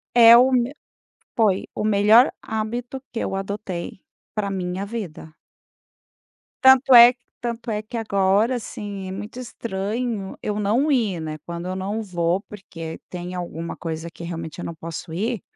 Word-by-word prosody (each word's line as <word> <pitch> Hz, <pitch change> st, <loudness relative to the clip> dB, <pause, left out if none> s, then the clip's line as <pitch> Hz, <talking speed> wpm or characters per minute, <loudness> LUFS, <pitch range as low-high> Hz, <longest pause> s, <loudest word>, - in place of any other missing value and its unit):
É 230 Hz, -1 st, +9 dB
o 250 Hz, +2 st, +6 dB
meu 250 Hz, +1 st, +1 dB, 0.6 s
Foi 210 Hz, -5 st, +3 dB, 0.2 s
o -, -, -1 dB
melhor 215 Hz, +4 st, +6 dB, 0.2 s
hábito 240 Hz, +3 st, -4 dB
que 230 Hz, -, -3 dB
eu -, -, -2 dB
adotei 195 Hz, -2 st, -5 dB, 0.3 s
pra 205 Hz, -2 st, -1 dB
minha 185 Hz, 0 st, -3 dB
vida. 195 Hz, -8 st, -7 dB, 1.3 s
Tanto 265 Hz, 0 st, +7 dB
é, 240 Hz, 0 st, +10 dB, 0.3 s
tanto 235 Hz, -1 st, -4 dB
é 210 Hz, 0 st, -1 dB
que 215 Hz, +3 st, -10 dB
agora, 205 Hz, +2 st, +2 dB
assim, 205 Hz, -4 st, -6 dB
é -, -, -5 dB
muito 210 Hz, +5 st, -7 dB
estranho 220 Hz, -2 st, -4 dB
eu 210 Hz, 0 st, -2 dB
não 235 Hz, +9 st, +2 dB
ir, 215 Hz, -, +1 dB
né. 155 Hz, -1 st, -5 dB
Quando 170 Hz, +1 st, -5 dB
eu 185 Hz, -, -3 dB
não 200 Hz, +4 st, -3 dB
vou, 175 Hz, -1 st, 0 dB
porque 165 Hz, -6 st, -8 dB
tem 180 Hz, 0 st, -6 dB
alguma 170 Hz, -2 st, -5 dB
coisa 165 Hz, 0 st, -5 dB
que 170 Hz, -, -9 dB
realmente 165 Hz, -1 st, -6 dB
eu -, -, -5 dB
não 170 Hz, -, -5 dB
posso 165 Hz, +1 st, -7 dB
ir, 215 Hz, +4 st, -2 dB
205 Hz, 160 wpm, -23 LUFS, 180-230 Hz, 1.3 s, é